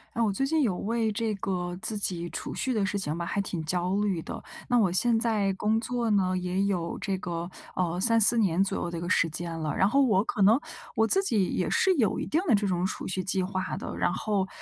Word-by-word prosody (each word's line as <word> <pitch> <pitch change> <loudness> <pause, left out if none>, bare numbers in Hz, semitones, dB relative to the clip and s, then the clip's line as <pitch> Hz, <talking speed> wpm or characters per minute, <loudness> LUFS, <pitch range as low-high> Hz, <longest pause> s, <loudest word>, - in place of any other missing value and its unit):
嗯， 230 - +2
我 205 - 0
最 270 - -1
近 315 +1 +1
有 200 -8 +1
为 225 +2 -1
这 215 0 -2
个 180 -2 -3
自 220 - 0
己 175 -4 -2
储 - - -5
蓄 260 - -1
的 215 -3 0
事 195 +1 -1
情 160 -5 -2
吧， 170 - -4
还 200 - -2
挺 180 -4 -3
焦 180 +3 0
虑 205 -4 0
的。 - - -7 0.2
那 245 -1 +3
我 195 -5 +2
现 225 +6 +2
在 215 -4 +1
工 215 +3 0
作 235 0 -2
呢， 190 -3 +2
也 180 +1 -1
有 180 -4 -2
这 195 -2 -2
个， 170 -1 -4 0.3
呃， 175 -1 -1
3-4 230 +1 +6
年 190 -3 +2
左 195 - -2
右 - - -3
的 170 - -5
一 - - -5
个 175 - -4
时 170 -2 +2
间 165 +1 -4
了。 155 -1 -2
然 190 - +3
后 275 +7 +3
我 210 -8 +3
可 220 -1 -3
能 215 +6 +6 0.4
我 225 - +3
自 385 +12 +4
己 220 - +1
也 - - -1
是 380 - +3
有 225 - +1
一 - - -3
定 320 - 0
的 240 - +5
这 205 0 0
种 180 -2 -1
储 - - -5
蓄 185 0 -2
计 185 +1 0
划 185 0 -3
的。 - - -6
然 - - +1
后 195 0 -1
195 Hz, 265 characters per minute, -27 LUFS, 180-225 Hz, 0.4 s, 3-4